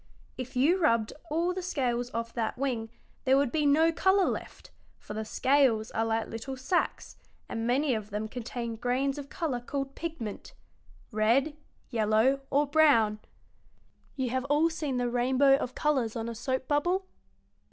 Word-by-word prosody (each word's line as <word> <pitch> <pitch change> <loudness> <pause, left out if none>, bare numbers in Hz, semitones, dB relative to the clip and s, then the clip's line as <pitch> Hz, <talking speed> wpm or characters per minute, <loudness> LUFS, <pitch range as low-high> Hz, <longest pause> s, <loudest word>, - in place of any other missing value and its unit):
If 255 0 -7
you 310 +9 +3
rubbed 230 -9 +2 0.2
all 340 +4 0
the 370 - -4
scales 245 -9 -1
off 230 0 -4
that 225 0 -2
wing 245 -4 -2 0.3
there 265 0 +4
would 275 -3 +2
be 300 -2 +1
no 320 +3 +4
color 380 +3 +3
left, - - -5 0.3
for - - -9
the 220 +1 -3
scales 245 -1 +2
are 225 - 0
like 225 0 0
little 230 +4 -6
sacs, 305 +8 -1 0.3
and 225 0 -3
many 265 +3 +2
of 215 -2 -4
them 210 +1 -3
contain 235 0 -5
grains 260 +4 0
of 280 -1 -8
color 300 -8 -2
called 275 +2 -4
pigment 305 -12 -6 0.6
red, 235 +8 +2 0.4
yellow, 225 +4 +3
or 290 +2 +3
brown. 275 -9 +4 1.0
You 260 -3 -2
have 260 +1 -1
all 295 +4 +3
seen 300 -5 -2
the 245 0 0
rainbow 260 +3 +4
of 255 -2 -5
colors 265 -7 0
on 230 -1 -3
a 235 - -4
soap 260 +3 -3
bubble? 350 +6 +1
260 Hz, 165 wpm, -29 LUFS, 230-290 Hz, 1.0 s, there